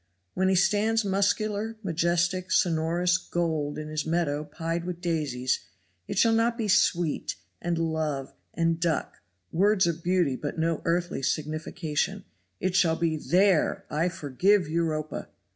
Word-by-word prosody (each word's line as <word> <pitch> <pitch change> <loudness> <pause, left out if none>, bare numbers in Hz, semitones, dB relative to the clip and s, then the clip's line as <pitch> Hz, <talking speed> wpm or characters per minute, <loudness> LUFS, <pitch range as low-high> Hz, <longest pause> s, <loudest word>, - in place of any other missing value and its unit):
When 190 0 +1
he 190 - +3
stands 210 +4 +2
muscular, 205 +3 0
majestic, 175 +1 0
sonorous, 175 +2 +2
gold, 160 -5 -2
in 155 0 -5
his 155 0 -2
meadow 160 -3 0
pied 165 +3 -3
with 175 -1 -5
daisies, 150 -8 -1 0.5
it - - -4
shall 225 +3 +5
not 230 +1 +2
be 225 -3 -1
"sweet" 175 -4 +2 0.3
and 170 -1 -1
"love" 160 -4 -2 0.2
and 165 -1 +1
"duck" 165 -3 -1 0.3
words 195 +2 +3
of 170 -1 -1
beauty 175 -6 +1
but 145 +4 -5
no 165 0 0
earthly 175 -2 0
signification; 155 +5 -2 0.3
it 185 -1 -1
shall 170 -3 +4
be, 165 -1 0
"There, 180 +2 +2
I 165 +4 +1
forgive 175 +5 +1
Europa." 155 -1 -2
170 Hz, 140 wpm, -27 LUFS, 155-185 Hz, 0.5 s, shall